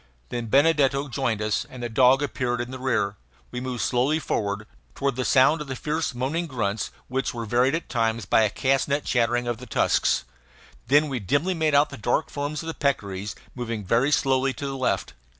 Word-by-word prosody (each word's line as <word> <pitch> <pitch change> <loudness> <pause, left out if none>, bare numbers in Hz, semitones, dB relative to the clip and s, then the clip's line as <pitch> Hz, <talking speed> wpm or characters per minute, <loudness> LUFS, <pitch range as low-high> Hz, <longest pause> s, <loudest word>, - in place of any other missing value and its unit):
Then 120 -1 -4
Benedetto 140 +1 +3
joined 120 -5 -1
us, 105 -1 0
and 125 -1 -9
the - - -1
dog 130 +4 +4
appeared 125 -3 -1
in 120 +1 -4
the 130 - -7
rear. 110 -6 0 0.3
We 125 - -4
moved 125 -2 -3
slowly 130 +5 +2
forward, 105 -8 -2 0.3
toward 140 -2 -1
the 130 - -1
sound 135 +6 +4
of 150 - -6
the 130 - -4
fierce 150 +1 -2
moaning 150 +8 -1
grunts 110 -6 -2 0.2
which 130 -1 -2
were 115 -1 -4
varied 125 +6 +2
at 165 - -4
times 115 -3 0
by 110 - +4
a 110 - +3
castanet 135 +4 +1
chattering 120 0 +1
of 120 -1 -1
the 125 - -10
tusks. - - +2 0.6
Then 145 +4 +4
we 135 -3 -3
dimly 145 - 0
made 160 -3 +1
out 145 +1 +4
the 140 - -7
dark 120 +7 0
forms 145 +2 -3
of - - -8
the 165 - -3
peccaries 100 -10 -2 0.2
moving 115 -4 -4
very 120 +9 +2
slowly 135 -2 +2
to 140 - -6
the 135 -1 -3
left. 130 -1 -1
130 Hz, 205 wpm, -25 LUFS, 115-140 Hz, 0.6 s, dog